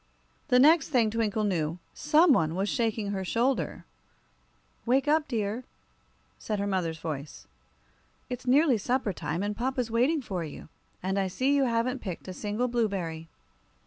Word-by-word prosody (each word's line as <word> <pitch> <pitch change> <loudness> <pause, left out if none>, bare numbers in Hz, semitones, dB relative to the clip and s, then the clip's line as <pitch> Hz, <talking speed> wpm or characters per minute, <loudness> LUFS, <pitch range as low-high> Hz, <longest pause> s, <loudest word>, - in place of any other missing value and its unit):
The 250 -4 +4
next 300 +3 +5
thing 235 -7 +2
Twinkle 220 -1 0
knew, 170 -5 -1 0.2
some 305 +1 +4
one 160 -7 +1
was 195 +2 0
shaking 220 -2 -1
her 190 -1 -2
shoulder. 240 +8 -1 1.0
"Wake 265 +4 +2
up, 305 +1 +3
dear," 225 -1 -2 0.8
said 215 - -3
her 200 - -1
mother's 180 -5 -1
voice. 150 -3 -6 0.8
"It's 250 0 -6
nearly 270 -2 +4
supper 245 -1 0
time, 170 +2 -3
and 205 0 -2
papa's 250 0 -2
waiting 265 +6 +2
for 185 -6 -3
you. 155 0 -9 0.3
And 190 +1 0
I 195 - +1
see 255 +9 0
you 280 -1 +3
haven't 240 +2 0
picked 185 -3 -6
a 185 - -5
single 210 +6 -2
blueberry." 190 -9 -2
225 Hz, 155 wpm, -28 LUFS, 190-255 Hz, 1.0 s, next